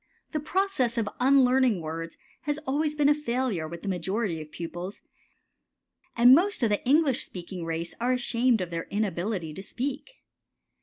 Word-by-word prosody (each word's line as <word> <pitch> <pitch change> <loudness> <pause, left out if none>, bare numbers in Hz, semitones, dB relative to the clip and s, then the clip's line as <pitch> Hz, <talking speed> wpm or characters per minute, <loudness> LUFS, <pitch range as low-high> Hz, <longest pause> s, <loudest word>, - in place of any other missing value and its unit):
The 305 - -1
process 300 - 0
of 225 -3 0
unlearning 255 -4 +4
words 165 +1 -6 0.3
has 295 0 0
always 300 +3 0
been 295 -1 +3
a 295 - +6
failure 245 - -2
with 170 +1 -8
the - - -5
majority 190 -1 -1
of 155 - -10
pupils, 175 +3 -6 1.2
and 245 +2 +8
most 360 - +3
of 225 - +3
the 205 - 0
English 280 -2 +3
speaking 180 -1 -7
race 165 +1 -3
are 250 +2 +2
ashamed 245 -2 +1
of 175 -2 -4
their 165 -1 -3
inability 195 -4 -2
to 190 - -7
speak. 280 - -5
230 Hz, 160 wpm, -27 LUFS, 175-270 Hz, 1.2 s, and